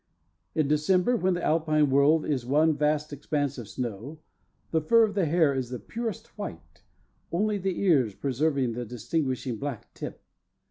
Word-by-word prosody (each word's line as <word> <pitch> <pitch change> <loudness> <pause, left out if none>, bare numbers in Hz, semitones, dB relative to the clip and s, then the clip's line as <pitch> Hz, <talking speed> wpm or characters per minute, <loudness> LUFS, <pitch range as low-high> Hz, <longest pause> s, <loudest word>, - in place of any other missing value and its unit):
In 155 -3 +2
December, 180 - +2
when 185 -5 +1
the 175 - -4
Alpine 155 -2 +2
world 145 +3 +4
is 140 -5 -1
one 150 +5 +3
vast 150 0 0
expanse 145 -1 -2
of 115 - -8
snow, 120 +6 -5 0.5
the 160 - +2
fur 230 +9 +5
of 215 -2 +1
the 195 -5 +1
hare 160 -2 +3
is 130 -3 -2
the 125 - -4
purest 225 - -6
white, 85 - -8 0.5
only 205 +4 0
the 190 -1 -2
ears 135 - +3
preserving 140 0 0
the 120 +2 -4
distinguishing 125 +1 -2
black 140 -2 -6
tip. - - -8
150 Hz, 165 wpm, -27 LUFS, 130-170 Hz, 0.5 s, fur